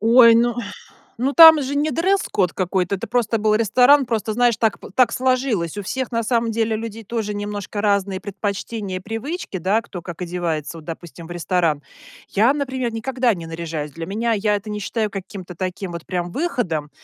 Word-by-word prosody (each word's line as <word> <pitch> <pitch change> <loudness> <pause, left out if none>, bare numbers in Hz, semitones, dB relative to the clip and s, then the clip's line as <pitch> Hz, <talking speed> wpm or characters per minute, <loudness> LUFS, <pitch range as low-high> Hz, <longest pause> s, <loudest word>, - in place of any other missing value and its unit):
Ой, 230 +1 +7
ну 235 +1 +3 0.7
ну 275 +2 +1
там 320 -2 +10
же 275 +2 -3
не 295 +2 +1
дресс-код 330 - +1
какой-то, 185 +1 0
это 185 - -5
просто 230 -2 0
был 215 0 +2
ресторан, 250 +6 +5
просто 220 -2 -1
знаешь 240 -1 +3
так 220 -3 0
п - - -10
так 250 -2 +4
сложилось. 255 - 0
У 205 - -2
всех 260 +5 -3
на 230 0 0
самом 230 0 +1
деле 225 0 0
людей 225 0 -6
тоже 215 -1 -3
немножко 205 0 -4
разные 200 -2 0
предпочтения 200 0 -4
и - - -5
привычки, 225 - -5
да. 195 +6 +1
Кто 180 - -9
как 175 +1 -8
одевается 170 -3 -3
вот 160 - -12
допустим 165 0 -8
в 175 - -10
ресторан. 170 -4 0 0.5
Я, 225 +7 +3
например, 260 -5 -2
никогда 245 0 0
не 165 -3 -7
наряжаюсь. 165 -3 -5
Для 165 +2 -6
меня 225 +5 -1
я 210 0 +1
это 205 +1 -5
не 210 0 -3
считаю 215 +1 -2
каким-то 185 -2 -8
таким 185 0 -4
вот 170 -1 -7
прям 175 -1 -3
выходом, 225 - -2
210 Hz, 190 wpm, -21 LUFS, 180-240 Hz, 0.7 s, там